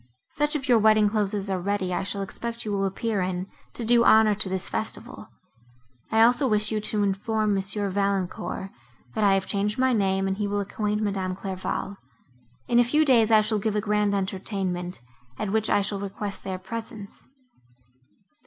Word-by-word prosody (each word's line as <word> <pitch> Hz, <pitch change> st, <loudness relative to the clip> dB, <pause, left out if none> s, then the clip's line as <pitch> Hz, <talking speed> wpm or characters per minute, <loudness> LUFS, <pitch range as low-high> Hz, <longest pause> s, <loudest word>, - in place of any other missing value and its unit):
Such 295 Hz, +1 st, -1 dB
of 275 Hz, -3 st, -3 dB
your 240 Hz, -3 st, +5 dB
wedding 215 Hz, -1 st, +4 dB
clothes 210 Hz, -1 st, 0 dB
as 200 Hz, -1 st, -3 dB
are 190 Hz, -2 st, -2 dB
ready 190 Hz, -1 st, -1 dB
I -, -, 0 dB
shall 200 Hz, 0 st, -3 dB
expect 235 Hz, +4 st, -5 dB
you 210 Hz, -, -2 dB
will 195 Hz, -1 st, 0 dB
appear 205 Hz, +1 st, -2 dB
in, 180 Hz, 0 st, -2 dB, 0.3 s
to 235 Hz, -, -4 dB
do 235 Hz, +1 st, +5 dB
honour 220 Hz, -2 st, +6 dB
to 205 Hz, -1 st, -1 dB
this 190 Hz, 0 st, -2 dB
festival. 220 Hz, 0 st, -4 dB, 0.8 s
I 220 Hz, 0 st, +5 dB
also 245 Hz, +4 st, +4 dB
wish 215 Hz, -2 st, +1 dB
you 215 Hz, -1 st, -1 dB
to 210 Hz, 0 st, 0 dB
inform 210 Hz, +2 st, 0 dB
Monsieur 200 Hz, +1 st, -1 dB
Valancourt, 195 Hz, -1 st, -2 dB, 0.4 s
that 215 Hz, -, -1 dB
I 195 Hz, -1 st, +5 dB
have 190 Hz, 0 st, 0 dB
changed 205 Hz, +2 st, -1 dB
my 260 Hz, 0 st, +3 dB
name, 195 Hz, -3 st, +1 dB
and 190 Hz, 0 st, -1 dB
he 205 Hz, -1 st, -1 dB
will 205 Hz, 0 st, -1 dB
acquaint 210 Hz, +1 st, -2 dB
Madame 190 Hz, -3 st, -2 dB
Clairval. 195 Hz, +1 st, -4 dB, 0.7 s
In 240 Hz, -, +4 dB
a -, -, +7 dB
few 300 Hz, +6 st, +2 dB
days 235 Hz, -5 st, +5 dB
I 220 Hz, -1 st, +6 dB
shall 215 Hz, 0 st, 0 dB
give 215 Hz, +1 st, -1 dB
a -, -, +2 dB
grand 210 Hz, -1 st, +1 dB
entertainment, 190 Hz, -2 st, -3 dB, 0.4 s
at 210 Hz, -, -3 dB
which 220 Hz, +1 st, +1 dB
I 205 Hz, -, +3 dB
shall 200 Hz, 0 st, -3 dB
request 200 Hz, 0 st, -6 dB
their 190 Hz, -1 st, -4 dB
presence." 210 Hz, +1 st, -7 dB
205 Hz, 190 wpm, -25 LUFS, 195-220 Hz, 0.8 s, a